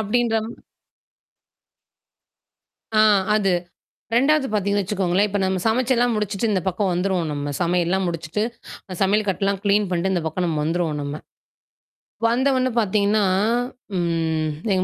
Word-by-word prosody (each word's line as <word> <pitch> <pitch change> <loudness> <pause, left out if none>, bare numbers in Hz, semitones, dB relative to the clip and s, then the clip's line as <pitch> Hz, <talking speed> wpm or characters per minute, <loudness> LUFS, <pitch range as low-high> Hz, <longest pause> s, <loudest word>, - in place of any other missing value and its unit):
அப்படின்ற 225 +2 +1 2.6
ஆ - - +7 0.3
அது. 195 -3 +2 0.6
2வது 275 +2 +3
பார்த்தீங்கன்னு 205 -1 +1
வச்சுக்கோங்களேன். 195 0 +1
இப்ப 205 0 -1
நம்ம 190 0 0
சமைச்செல்லாம் 245 +1 +2
முடிச்சுட்டு 210 +1 -1
இந்த 190 -3 +1
பக்கம் 190 +1 0
வந்துருவோம் 180 -2 0
நம்ம. 145 0 -3
சமையல்லாம் 180 +2 +1
முடிச்சுட்டு, 165 +4 -2 0.5
அ - - -4
சமையல் 205 +2 +2
கட்டுலாம் 195 0 -1
கிளீன் 205 0 +3
பண்ணிட்டு, 180 +2 0
இந்த 175 -3 -1
பக்கம் 170 +3 -1
நம்ம 160 -2 -1
வந்துருவோம் 165 -2 -1
நம்ம. 145 0 -4 1.1
வந்த 250 +4 +2
ஒன்ன 255 0 +1
பார்த்தீங்கன்னா, 205 +1 +2 0.7
ம். 165 -2 0 0.2
எங்க 185 -1 +1
195 Hz, 125 wpm, -22 LUFS, 175-215 Hz, 2.6 s, ஆ